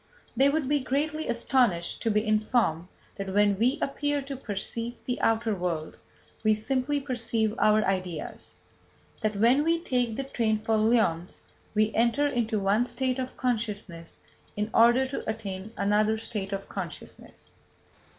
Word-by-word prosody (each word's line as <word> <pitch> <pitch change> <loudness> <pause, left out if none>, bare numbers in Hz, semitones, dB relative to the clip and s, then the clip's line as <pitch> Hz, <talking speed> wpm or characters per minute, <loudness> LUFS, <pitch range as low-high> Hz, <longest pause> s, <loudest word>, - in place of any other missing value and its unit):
They 275 +1 +5
would 295 -1 0
be 290 +1 +2
greatly 295 +4 -1
astonished 235 -8 +1
to 230 - 0
be 210 0 +1
informed 215 -6 +1 0.3
that 195 -1 -4
when 205 -1 +3
we 250 +6 +3
appear 290 0 -1
to 275 0 -6
perceive 230 0 -4
the 250 - -2
outer 225 0 +2
world, 175 -4 -3 0.4
we 215 -1 +4
simply 260 +6 -1
perceive 230 -5 -1
our 215 0 +4
ideas; 185 -4 -3 0.7
that 215 -2 0
when 240 +8 +4
we 330 +1 +2
take 245 -8 0
the 275 - -2
train 230 -5 0
for 220 +1 0
Lyons 215 -6 +1 0.3
we 215 +1 +2
enter 235 +5 +2
into 235 -5 0
one 200 +4 +2
state 260 0 -1
of 255 0 -5
consciousness 210 -9 -3 0.4
in 210 +1 -2
order 240 +3 +5
to 265 -4 -5
attain 205 -2 -5
another 210 +2 +2
state 210 -3 -5
of 195 0 -4
consciousness. 180 -6 -8
225 Hz, 150 wpm, -27 LUFS, 205-255 Hz, 0.7 s, They